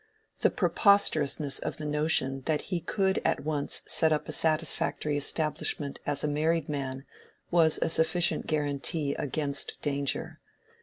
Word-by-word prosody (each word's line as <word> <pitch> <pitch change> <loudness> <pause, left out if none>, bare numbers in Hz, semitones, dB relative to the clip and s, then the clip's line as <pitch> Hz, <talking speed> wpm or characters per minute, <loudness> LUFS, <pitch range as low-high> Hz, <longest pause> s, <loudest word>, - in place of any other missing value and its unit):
The - - +3
preposterousness 155 - +2
of - - -5
the 155 - -6
notion 150 -3 0
that 155 -2 +1
he 175 - +1
could 190 +3 0
at - - 0
once 150 -2 -1
set 160 -1 +3
up 150 - -1
a - - -4
satisfactory 155 -1 +1
establishment 145 -1 -1
as 145 -1 -1
a - - +1
married 155 +1 0
man 135 -2 -4 0.5
was 165 -3 +4
a - - 0
sufficient 165 +2 +1
guarantee 145 0 -1
against 140 0 -1
danger. 140 -1 -2
150 Hz, 140 wpm, -28 LUFS, 145-160 Hz, 0.5 s, was